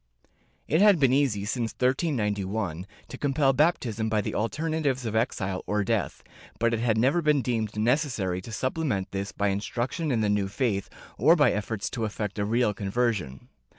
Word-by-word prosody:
It 160 +5 +2
had 205 -3 +7
been 135 -3 +4
easy, 130 -8 +1
since 115 0 -2
1391, 105 - -1 0.2
to - - -8
compel 140 -1 +2
baptism 120 -7 +1
by 110 -1 +1
the 105 - -3
alter 150 +9 -2
natives 145 -6 -1
of 110 -1 -3
exile 95 -5 -1
or 105 0 +1
death, 105 -3 -2 0.3
but 115 +1 +1
it 115 - 0
had 115 -2 +1
never 135 +9 +3
been 150 -4 +2
deemed 110 -3 -2
necessary 115 - 0
to 115 - -10
supplement 130 -4 -2
this 100 0 -3
by 100 0 0
instruction 120 - -2
in 115 -3 +1
the 105 - +1
new 105 -1 +1
faith, 100 -2 -1 0.3
or 155 +9 +6
by 150 -4 +4
efforts 105 0 -3
to 115 -3 -2
effect 105 -1 -4
a 100 - +1
real 115 0 +1
conversion. 100 - -2
115 Hz, 180 wpm, -27 LUFS, 105-135 Hz, 0.3 s, had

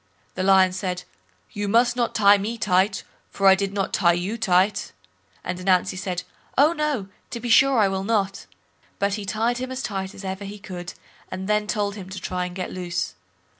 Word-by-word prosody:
The - - -4
Lion 190 -1 +5
said, 185 -1 -3 0.5
"You 205 0 -3
must 235 +3 +3
not 240 -1 -1
tie 205 -1 +6
me 220 +4 -3
tight, 195 -2 +1 0.3
for 195 - -3
I 190 - +9
did 195 0 -1
not 200 -1 -2
tie 175 -2 +4
you 180 +6 -2
tight." 195 -2 +1 0.5
And 180 0 -4
Ananzi 185 0 +2
said, 185 -1 -3 0.3
"Oh! 300 +4 +5
no, 300 - -1 0.2
to 235 - -5
be 240 +1 -5
sure 270 +3 +5
I 210 -3 +5
will 190 0 -2
not." 195 -2 -1 0.5
But 200 0 0
he 205 0 -4
tied 230 +4 0
him 255 0 -4
as 260 +1 -4
tight 195 -1 -4
as 195 - -9
ever 190 +1 -4
he 200 +1 -7
could, 180 -3 -8 0.3
and 190 +1 -5
then 210 0 +1
told 205 -2 -1
him 190 -2 -8
to 190 0 -6
try 180 0 -3
and 175 - -10
get 185 -1 -4
loose. 175 -2 -3
195 Hz, 205 wpm, -24 LUFS, 185-215 Hz, 0.5 s, I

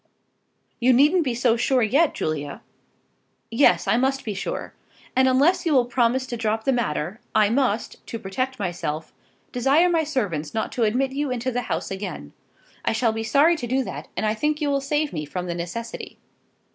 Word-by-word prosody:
"You 255 +1 +4
needn't 300 +8 +5
be 255 -5 -1
so 240 -1 +3
sure 250 +1 +2
yet, 280 +9 +3
Julia." 145 -2 -3 0.9
"Yes, 235 +5 +4
I - - +3
must 270 +2 0
be 215 - -2
sure. 195 - -4 0.4
And 260 +1 +4
unless 275 +8 +3
you 325 - +1
will 255 -3 +4
promise 245 +1 +1
me - - -15
to 240 - -3
drop 220 0 -1
the 270 - +2
matter, 205 - -1 0.2
I 215 -1 +4
must, 235 -4 0
to 230 - -4
protect 255 +6 -3
myself, 170 -6 -4 0.4
desire 275 +8 +3
my 330 -2 +2
servants 200 - -2
not 220 - -1
to 235 - +1
admit 260 +5 +1
you 285 +1 -2
into 250 0 -2
the 245 0 -1
house - - -2
again. 190 - -6 0.5
I - - +1
shall 225 0 +2
be 225 - -3
sorry 285 +9 +4
to 245 - -4
do 260 +2 +1
that, - - -7
and - - 0
I 215 - +2
think 300 +7 -1
you 295 -2 0
will 275 0 +1
save 295 +2 -1
me 155 - -3
from 180 +5 -5
the 175 - -3
necessity." 175 +7 -6
245 Hz, 195 wpm, -24 LUFS, 210-270 Hz, 0.9 s, needn't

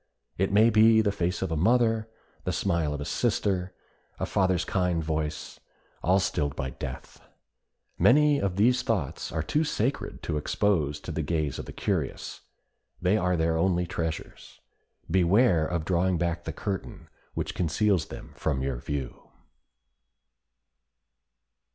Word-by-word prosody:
It 95 +1 0
may 110 +3 +5
be 110 0 +6
the 105 -2 +1
face 90 -1 -1
of 95 - -3
a - - 0
mother, 110 +4 +2 0.3
the - - -1
smile 85 -6 0
of 75 0 -4
a - - -4
sister, 95 +2 0 0.5
a - - 0
father's 95 -3 +1
kind 90 -3 0
voice, 80 0 -3 0.4
all 95 +3 +3
stilled 75 -6 -1
by 65 -2 -3
death. - - -8 0.8
Many 145 +2 +5
of 95 -2 -1
these 120 +5 +3
thoughts 100 - -2
are 80 -2 -2
too 150 - +1
sacred 135 -3 -2
to 75 - -2
expose 75 -2 0
to - - -6
the - - -2
gaze 75 -5 -1
of - - -5
the - - -8
curious; - - -3 0.6
they 90 +3 +2
are 90 -4 +1
their 80 0 +1
only 90 0 +2
treasures; 80 -2 -5 0.5
beware 90 -1 +3
of 85 -3 -2
drawing 90 +1 +1
back 85 0 -2
the 80 - -3
curtain 95 +4 -5 0.3
which - - -3
conceals 90 +1 +1
them - - -9
from 65 -4 -1
your 65 -2 -2
view. 65 0 -5
90 Hz, 145 wpm, -27 LUFS, 80-105 Hz, 0.8 s, be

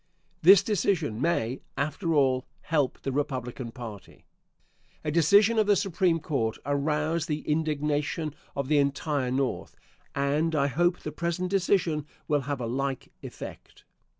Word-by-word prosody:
This 190 +3 +8
decision 175 - 0
may, 135 -7 0 0.2
after 155 +4 -1
all, 130 -3 +2
help 150 -5 0
the 135 - -1
Republican 130 -3 -3
party. 110 -5 -10 0.8
A 150 - 0
decision 200 +8 +5
of 215 - +3
the 205 - +5
Supreme 180 -3 +1
Court 130 -8 -1
aroused 150 +3 0
the 150 -2 -2
indignation 150 0 -1 0.2
of 140 -1 -2
the 150 0 +3
entire 140 -1 0
North, 130 +1 -2 0.4
and 145 +4 +1
I 140 -2 +3
hope 175 +6 +2
the 150 - -5
present 170 +3 -2
decision 180 -6 +1 0.2
will 145 -1 +2
have 140 -2 -1
a 120 - -3
like 135 +2 -3
effect. - - -10
150 Hz, 140 wpm, -27 LUFS, 140-165 Hz, 0.8 s, This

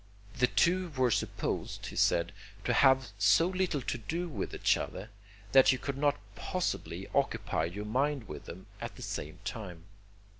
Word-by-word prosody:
The 125 0 +3
two 180 +5 +2
were 130 -2 +3
supposed, - - -2
he - - -7
said, 85 0 +3 0.3
to - - +1
have 130 -3 +5
so 105 +11 +5
little 185 -7 -1
to 120 - -2
do 170 +10 -3
with 110 - -4
each - - +3
other, 105 +4 -5 0.4
that 135 +2 +7
you 130 - +1
could 140 +1 -4
not 145 -4 +2 0.2
possibly 185 -1 -3
occupy - - +1
your 100 +5 -5
mind 130 +2 0
with 75 -4 -8
them 95 +3 -9 0.2
at - - -5
the - - -9
same 75 +4 -5
time. 95 -8 -6
125 Hz, 165 wpm, -31 LUFS, 105-150 Hz, 0.4 s, that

